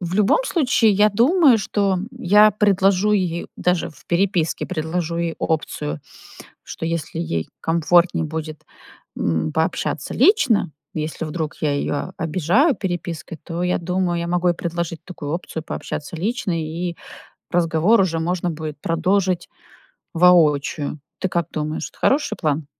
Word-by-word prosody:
в 175 0 -4
любом 210 - +3
случае, 255 - +3
я 210 +2 +4
думаю, 260 - +5
что 200 -2 0
я 215 -4 +5
предложу 200 0 +2
ей 175 -4 0
даже 180 -1 0
в 135 - -20
переписке, 175 -2 0
предложу 170 0 -2
ей 170 -1 -1
опцию, 80 - -2 0.6
что - - -7
если 165 -1 -3
ей 85 - -2
комфортней 170 +1 +2
будет, 155 0 -6 0.5
м, 80 -2 -1
пообщаться 160 - -1
лично, 250 - +3 0.2
если 155 +1 -3
вдруг 155 -1 -4
я 145 -2 +1
её 145 0 -2
обижаю 185 - +2
перепиской, 175 -3 -5
то, 170 +1 -4
я 180 - +1
думаю, 180 0 -1
я 170 - -3
могу 180 0 +1
ей 175 - +3
предложить 170 -1 -4
такую 150 -6 -7
опцию 165 -2 -4
пообщаться 155 0 -5
лично 200 +2 -2
и 170 +2 -4 0.6
разговор 175 +5 +3
уже 165 -4 0
можно 175 +1 -1
будет 155 -2 -6
продолжить 180 +2 0 0.7
воочию. 155 -4 +3 0.2
Ты 190 - 0
как 170 -3 -1
думаешь, 155 0 -3
это - - -24
хороший 290 +2 +2
план? 150 -2 -1
170 Hz, 140 wpm, -21 LUFS, 160-190 Hz, 0.7 s, думаю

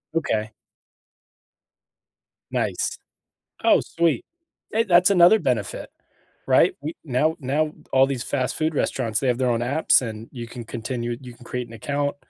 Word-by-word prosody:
Okay. 110 -9 -1 2.0
Nice. - - -1 0.7
Oh, - - +6
sweet. 170 - 0 0.5
Hey, 225 +1 +2
that's 180 0 +5
another 185 +3 +6
benefit. 125 - -2 0.6
Right? - - +4
We 155 +3 -4
now 155 +4 +1
now 150 +3 0 0.2
all 135 0 +5
these 130 -2 -3
fast 130 -1 -1
food 155 0 0
restaurants, 115 -6 0
they 130 - 0
have 120 0 +1
their 125 -1 +1
own 115 0 +1
apps, 135 +2 +3
and 110 -1 -6
you 120 -3 -7
can 120 -1 -8
continue 120 +1 -4
you 125 -2 -10
can 120 - -16
create 125 -1 -4
an - - -13
account, 145 +2 -2
130 Hz, 150 wpm, -23 LUFS, 120-155 Hz, 2.0 s, Oh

